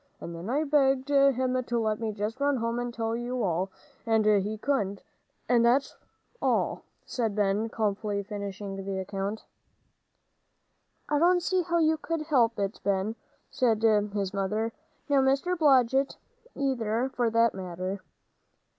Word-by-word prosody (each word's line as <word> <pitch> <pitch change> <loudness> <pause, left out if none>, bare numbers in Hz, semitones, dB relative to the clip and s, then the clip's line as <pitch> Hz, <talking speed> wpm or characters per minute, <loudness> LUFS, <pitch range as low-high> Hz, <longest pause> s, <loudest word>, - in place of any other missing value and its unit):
And 170 - -7
then 170 +5 -6
I 290 +5 +1
begged 275 -2 +2
him 260 -2 +3
to 240 -1 -1
let 215 -1 0
me 225 -1 -2
just 210 +4 -4
run 285 -1 +2
home 230 0 -1
and 245 0 -3
tell 225 -1 -2
you 240 +1 -2
all, 185 +1 0 0.3
and 225 -2 +2
he 210 0 +2
couldn't, 205 -6 -1 0.4
and 240 -1 +4
that's 250 +4 +2 0.5
all," - - +1 0.2
said 225 -5 -2
Ben, 210 +2 +1
calmly 205 -2 -1
finishing 200 -1 -6
the 195 0 -3
account. 195 +2 -4 1.6
"I 295 - +1
don't 355 +2 +4
see 370 +1 +1
how 340 0 0
you 320 -1 +3
could 325 0 -3
help 245 -7 +2
it, 200 0 -2
Ben," 200 +2 0 0.4
said 230 -4 +1
his 205 -3 +2
mother, 210 +3 -1 0.3
"nor 280 -2 +4
Mr. 275 +7 +2
Blodgett 270 -4 +3 0.4
either, 255 -2 -1
for 240 -2 +1
that 230 0 +3
matter." 185 +1 -5
230 Hz, 145 wpm, -28 LUFS, 205-270 Hz, 1.6 s, and